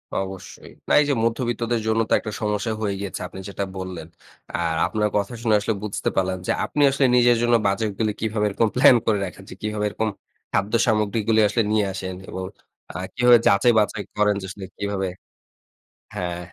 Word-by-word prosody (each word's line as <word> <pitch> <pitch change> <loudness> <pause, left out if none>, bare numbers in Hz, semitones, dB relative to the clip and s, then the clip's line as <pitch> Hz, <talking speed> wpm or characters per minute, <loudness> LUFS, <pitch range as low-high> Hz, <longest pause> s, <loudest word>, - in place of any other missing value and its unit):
অবশ্যই। 95 -1 -6 0.2
না, - - -3
এই 150 - +1
যে - - +3
মধ্যবিত্তদের 115 0 -1
জন্য 110 0 +2
তো - - +2
একটা 110 - -6
সমস্যা 105 +1 -1
হয়ে 100 -2 -1
গিয়েছে। 100 -2 -5
আপনি 95 - -10
যেটা 100 0 -3
বললেন। 90 -4 -6 0.5
আর 85 -1 0
আপনার 105 -1 0
কথা 100 +3 -2
শুনে 110 -3 +3
আসলে 110 +2 -1
বুঝতে 105 - -2
পারলাম, 95 -1 0
যে - - +2
আপনি 150 - -2
আসলে 135 0 +2
নিজের 120 -1 +5
জন্য 120 0 +3
বাজেটগুলি 105 +1 0
কিভাবে 110 -1 0
এরকম 110 +3 +1
প্লান 130 0 +7
করে 110 -2 +3
রাখেন 95 +2 -9
যে - - -9
কিভাবে 105 0 -2
এরকম 110 +1 -2 0.4
খাদ্য 100 +2 0
সামগ্রীগুলি 110 0 +1
আসলে 110 +3 +1
নিয়ে 110 -2 +2
আসেন 95 -1 -5
এবং 95 - -5 0.5
আ - - -17 0.2
কিভাবে 125 0 +6
যাচাই-বাঁচাই 105 0 +3
করেন, 105 -1 +3
যে 95 - -5 0.3
কিভাবে 100 -1 -2 1.1
হ্যাঁ, 90 -1 -3
105 Hz, 175 wpm, -23 LUFS, 95-115 Hz, 1.1 s, প্লান